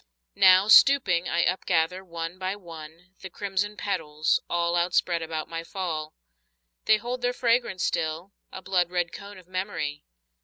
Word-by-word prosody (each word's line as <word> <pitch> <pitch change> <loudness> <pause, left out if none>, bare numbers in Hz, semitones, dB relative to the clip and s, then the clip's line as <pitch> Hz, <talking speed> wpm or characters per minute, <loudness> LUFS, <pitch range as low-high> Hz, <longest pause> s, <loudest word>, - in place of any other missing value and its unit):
Now, 185 - +6
stooping, 210 -7 +5
I 170 - +1
upgather, 180 0 0
one 170 0 -6
by 190 +1 -2
one, 170 -1 -12
The 190 - -8
crimson 200 +2 -3
petals, 155 -6 -1
all 170 0 0
Outspread 175 -1 +1
about 160 -1 -4
my 165 0 -5
fall. 165 -4 -5 0.7
They 215 - +5
hold 245 +3 -5
their 245 0 0
fragrance 235 -6 0
still, 160 +5 -2 0.2
a 190 - -9
blood 180 -2 +1
red 175 -1 -1
cone 200 0 -10
Of 180 -2 -16
memory. 185 -6 -4
180 Hz, 150 wpm, -26 LUFS, 165-200 Hz, 0.7 s, Now